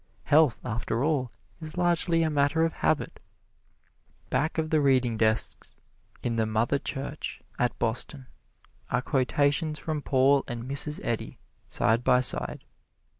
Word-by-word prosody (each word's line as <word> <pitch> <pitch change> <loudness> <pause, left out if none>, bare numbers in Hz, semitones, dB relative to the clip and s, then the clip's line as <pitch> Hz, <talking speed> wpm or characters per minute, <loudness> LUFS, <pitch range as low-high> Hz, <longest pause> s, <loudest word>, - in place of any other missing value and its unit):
Health, 150 -5 +3
after 120 0 -2
all, 140 -5 0 0.3
is 155 0 -9
largely 170 -1 +2
a 160 - 0
matter 145 +2 +2
of 165 - -2
habit. 155 - -1 1.1
Back 145 +6 0
of 155 -1 -1
the 155 -1 +3
reading 130 -4 +2
desks, 110 0 0 0.5
in 115 -1 -1
the 110 -1 +1
"Mother 115 +6 0
Church," 140 +3 -5 0.2
at 125 -1 0
Boston, 120 +4 -2 0.6
are 125 0 0
quotations 145 +3 0
from 155 -2 -4
Paul 135 0 +3
and 120 -1 -5
Mrs. 140 +3 0
Eddy, 115 -2 -3 0.3
side 115 +4 +1
by 125 0 +4
side. 125 - +3
135 Hz, 135 wpm, -27 LUFS, 120-155 Hz, 1.1 s, by